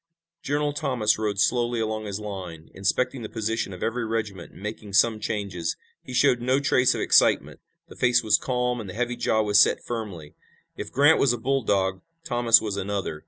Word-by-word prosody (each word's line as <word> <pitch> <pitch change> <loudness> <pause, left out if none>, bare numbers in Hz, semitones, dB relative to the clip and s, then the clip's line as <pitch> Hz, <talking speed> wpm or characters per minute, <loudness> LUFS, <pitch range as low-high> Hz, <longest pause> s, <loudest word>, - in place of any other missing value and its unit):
General 145 +1 -1
Thomas 125 -9 0
rode 105 -2 -2
slowly 120 +1 +1
along 110 -1 -2
his 100 -1 -4
line, 95 -6 -8
inspecting 125 +6 -1
the 110 - -6
position 110 -2 -3
of 90 - -7
every 120 +1 -1
regiment 110 -5 -4
and - - -15
making 105 0 -7
some 110 +3 +3
changes. 100 -6 -3 0.2
He - - -11
showed 125 -1 +3
no 130 +3 +2
trace 130 -3 +2
of - - -3
excitement. - - +3 0.3
The - - -13
face 125 -1 +2
was 110 -2 +3
calm 125 -1 -1
and 100 - -8
the 90 - -8
heavy 120 +1 -2
jaw 110 -2 +1
was 105 -1 +4
set - - +4
firmly. 100 -11 -6 0.4
If - - -7
Grant 145 +4 +4
was 130 -3 +3
a - - -3
bulldog 105 -7 0 0.2
Thomas 120 -5 +4
was 105 -2 -4
another. 100 -5 -3
110 Hz, 190 wpm, -25 LUFS, 100-125 Hz, 0.4 s, was